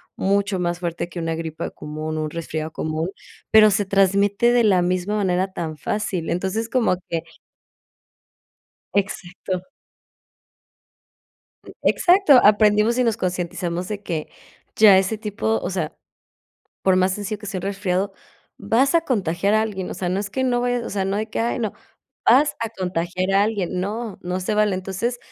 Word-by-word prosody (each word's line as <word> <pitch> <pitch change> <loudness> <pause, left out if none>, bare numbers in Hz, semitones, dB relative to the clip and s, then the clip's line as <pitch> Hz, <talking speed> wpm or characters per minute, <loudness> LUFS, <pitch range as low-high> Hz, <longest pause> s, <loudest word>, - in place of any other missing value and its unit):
mucho 200 0 0
más 175 -1 -1
fuerte 175 0 -3
que 175 - -10
una 165 -1 -2
gripa 160 0 -5
común, 155 +1 -5
un 155 0 -2
resfriado 160 -1 -4
común, 160 +3 -3 0.4
pero 215 -1 +7
se 205 +1 +2
transmite 200 +4 +3
de 240 -1 +4
la 190 -5 +4
misma 185 +3 -1
manera 190 -2 0
tan 160 -3 -4
fácil, 185 +1 -3
entonces, 195 +6 -2
como 230 -7 +2
que 165 -1 -2 1.7
Exacto. 185 -2 -3 2.2
Exacto, 355 -7 +5
aprendimos 210 +2 +4
y 250 - +3
nos 230 -2 +1
concientizamos 180 -1 -3
de 210 -1 -5
que, 165 -6 -4 0.5
ya 205 -3 +7
ese 195 +3 +1
tipo, 200 - -1
o - - -3
sea, 175 -5 -3 0.9
por 190 -1 +3
más 185 0 +3
sencillo 205 +1 -4
que 210 - -10
sea 195 -2 -3
un - - -7
resfriado, 195 0 -1 0.5
vas 235 +9 +2
a 335 - +4
contagiar 200 - 0
a 215 - +4
alguien, 190 -4 -4
o - - -5
sea, 180 - -3
no 185 - 0
es 200 -1 -5
que 260 +6 -2
no 245 -1 +1
vayas, 245 0 0
o - - -5
sea, 195 -1 -1
no 195 +1 -1
hay 215 +1 -1
que, 220 - -4
ay, 235 +2 0
no, 220 -4 -2 0.5
vas 290 +5 +5
a 225 - -2
contagiar 185 -2 -2
a 195 +1 +5
alguien, 200 -4 -1
no, 215 +2 -4
no 180 +1 -3
se 185 +3 -1
vale, 210 -2 +2
entonces, 195 +6 -3
195 Hz, 170 wpm, -22 LUFS, 180-215 Hz, 2.2 s, pero